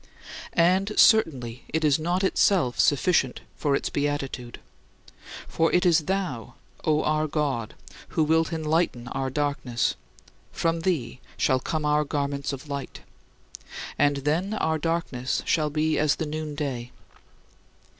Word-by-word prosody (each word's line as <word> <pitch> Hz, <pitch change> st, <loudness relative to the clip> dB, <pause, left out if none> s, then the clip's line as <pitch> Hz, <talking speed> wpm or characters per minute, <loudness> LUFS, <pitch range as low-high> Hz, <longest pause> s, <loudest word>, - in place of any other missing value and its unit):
And 185 Hz, +5 st, +3 dB
certainly 130 Hz, -, +4 dB
it 160 Hz, 0 st, -1 dB
is 145 Hz, 0 st, +3 dB
not 175 Hz, +4 st, 0 dB
itself 185 Hz, -8 st, +2 dB
sufficient 145 Hz, -3 st, +2 dB
for 145 Hz, -2 st, +1 dB
its -, -, -2 dB
beatitude. 140 Hz, -4 st, -3 dB, 0.9 s
For 165 Hz, 0 st, +1 dB
it 180 Hz, +1 st, +3 dB
is 165 Hz, -3 st, +4 dB
thou, 180 Hz, -, -3 dB, 0.3 s
O 155 Hz, -1 st, +2 dB
our 155 Hz, 0 st, +1 dB
God, 140 Hz, -7 st, -2 dB, 0.3 s
who 160 Hz, -, 0 dB
wilt 160 Hz, +1 st, +2 dB
enlighten 155 Hz, -6 st, 0 dB
our 135 Hz, -1 st, -2 dB
darkness; 135 Hz, -4 st, -1 dB, 0.6 s
from 165 Hz, 0 st, 0 dB
thee 150 Hz, -9 st, -1 dB, 0.2 s
shall 130 Hz, -, +2 dB
come 155 Hz, +3 st, -3 dB
our 150 Hz, 0 st, +3 dB
garments 140 Hz, -1 st, -2 dB
of 135 Hz, +1 st, -7 dB
light; 140 Hz, -1 st, -6 dB, 0.9 s
and 145 Hz, -1 st, +2 dB
then 180 Hz, +8 st, 0 dB
our 160 Hz, -6 st, 0 dB
darkness 155 Hz, -6 st, -2 dB
shall 155 Hz, -2 st, +1 dB
be 155 Hz, +1 st, 0 dB
as 150 Hz, -1 st, +3 dB
the 160 Hz, -, -3 dB
noonday. 150 Hz, -5 st, -4 dB
150 Hz, 130 wpm, -26 LUFS, 135-165 Hz, 0.9 s, certainly